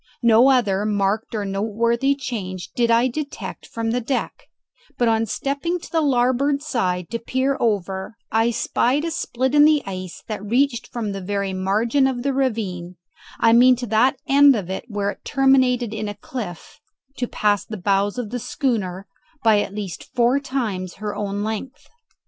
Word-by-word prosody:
No 235 +3 +6
other 210 -7 +2
marked 210 +1 0
or 210 -2 -2
noteworthy 230 +7 0
change 195 -10 -5
did 235 -1 +1
I 230 +2 +4
detect 285 +3 -6
from 225 -1 -3
the 245 +1 0
deck; 250 +3 -3 0.5
but 240 - +2
on 225 0 +2
stepping 285 - -2
to - - -12
the 325 - +2
larboard 275 +1 +2
side 180 - -1
to 230 - -2
peer 260 +4 0
over 200 -1 -1
I 225 +2 +3
spied 250 +5 0
a 335 - -2
split 260 -3 -2
in 295 0 +7
the 305 -1 +4
ice 185 -2 -7
that 215 -2 -5
reached 240 +2 +1
from 225 -4 -4
the 195 0 -5
very 200 0 -2
margin 215 +8 +1
of 245 -2 -3
the 275 0 0
ravine, 205 -9 -2 0.4
I 225 - +5
mean 250 +2 +7
to 245 0 -5
that 240 +6 +3
end 280 0 +6
of 190 -4 -4
it 190 - -4
where 205 -3 -2
it 195 - -14
terminated 260 -4 +2
in 215 -1 -3
a 205 - -6
cliff, 205 - -7 0.4
to 245 - -1
past 205 -3 0
the 215 - -5
bows 200 +2 +1
of 235 -4 -4
the 245 - -3
schooner 200 -8 -2 0.4
by 220 -2 +5
at 200 - -5
least 200 -5 -5
four 245 +3 +3
times 220 -10 -3
her 210 0 -5
own 205 0 -3
length. 220 +7 -5
230 Hz, 180 wpm, -22 LUFS, 200-260 Hz, 0.5 s, in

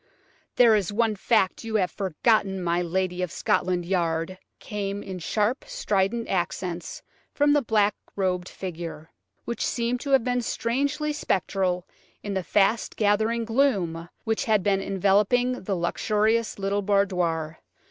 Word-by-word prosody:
"There 235 -2 +6
is 205 -2 0
one 220 0 +1
fact 200 -1 +1
you 225 -1 -4
have 185 -4 +2
forgotten, 195 +1 +1
my 175 -1 0
lady 180 +1 -1
of 180 -3 -2
Scotland 180 +4 0
Yard," 170 0 -1 0.2
came 205 -1 -4
in 185 -2 -6
sharp, 210 - 0
strident 230 - 0
accents 175 -1 -3 0.3
from 290 0 +4
the 290 - +4
black 210 -4 +2 0.2
robed 185 -2 -1
figure, 170 -3 -7 0.3
which 235 - -3
seemed 240 +1 -1
to 280 - -6
have 270 -3 +4
become 245 0 0
strangely 280 +6 -1
spectral 185 - -1 0.4
in 205 - -3
the 190 - 0
fast 205 +5 +1
gathering 220 +2 +1
gloom 195 -10 +1
which 220 -1 -1
had 215 -4 +2
been 195 -1 +2
enveloping 205 +6 +2
the 195 - 0
luxurious 215 +6 0
little 200 +1 -1
boudoir. 180 -6 0
200 Hz, 140 wpm, -25 LUFS, 180-230 Hz, 0.4 s, There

